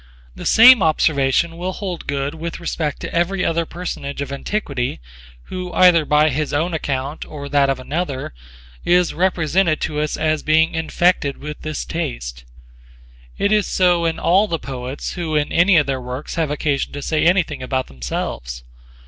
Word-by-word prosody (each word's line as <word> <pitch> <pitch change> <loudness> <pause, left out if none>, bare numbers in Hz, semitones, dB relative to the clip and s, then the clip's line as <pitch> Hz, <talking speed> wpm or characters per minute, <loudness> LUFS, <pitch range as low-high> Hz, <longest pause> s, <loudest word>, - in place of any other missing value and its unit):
The - - -6
same 240 0 +8
observation 155 0 +2
will 185 +2 -3
hold 185 -4 -5
good 140 +1 -2
with 165 +1 -6
respect 160 -3 -3
to - - -6
every 180 +2 0
other 165 0 0
personage 155 -5 -6
of 140 -1 -4
antiquity 140 -5 -3 0.4
who 180 - -6
either 175 -4 +5
by 150 +1 +3
his 150 +3 -2
own 165 +4 0
account 140 -1 -3
or 145 -2 -8
that 140 -1 +3
of 135 -1 0
another 140 - -4 0.5
is 175 0 +3
represented 175 -1 +1
to 150 -1 -2
us 150 0 -1
as 155 -1 0
being 160 +1 +3
infected 160 -3 +1
with 150 +1 -8
this 155 -1 -4
taste. - - -5 0.9
It 200 - +1
is 210 -2 +3
so 175 -2 +2
in 165 - 0
all 195 +5 +3
the 170 - -1
poets 130 -1 -6
who 165 -3 -3
in 150 -1 0
any 175 +2 +4
of 150 - +4
their 135 -2 -2
works 125 +3 -6
have 165 -3 -1
occasion 145 -1 -1
to 145 0 -6
say 155 +1 0
anything 170 -6 +1
about 130 0 -1
themselves. 60 -1 -5
155 Hz, 170 wpm, -20 LUFS, 140-175 Hz, 0.9 s, same